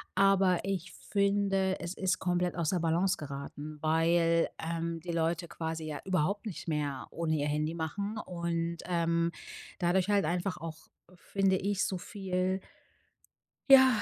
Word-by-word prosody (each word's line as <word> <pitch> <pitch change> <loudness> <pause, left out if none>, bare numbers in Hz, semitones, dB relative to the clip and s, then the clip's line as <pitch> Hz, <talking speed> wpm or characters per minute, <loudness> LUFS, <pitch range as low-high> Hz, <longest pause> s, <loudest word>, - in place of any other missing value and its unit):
aber 195 -2 +4
ich 185 -2 -2
finde, 200 -1 +1
es 170 +1 -4
ist 190 -1 0
komplett 180 -1 0
aus 165 -3 0
der 180 - +1
Balance 170 +3 +2
geraten, 145 +1 -7
weil, 165 +1 +3
ähm, 165 0 -2
die 170 +2 -5
Leute 170 +1 0
quasi 160 -1 -4
ja 150 -2 -4
überhaupt 190 +3 0
nicht 195 -5 -6
mehr 145 -4 -2
ohne 160 -1 0
ihr 145 - 0
Handy 150 +2 0
machen 200 +6 -3
und, 170 -3 -2
ähm, 170 -1 +1 0.5
dadurch 180 +2 +2
halt 200 -4 +3
einfach 180 +4 -1
auch, 165 -1 -8 0.3
finde 195 +1 +1
ich, 200 +1 0
so 190 - -2
viel 185 -1 -2 1.1
ja, 260 -3 +8
175 Hz, 145 wpm, -31 LUFS, 165-190 Hz, 1.1 s, ja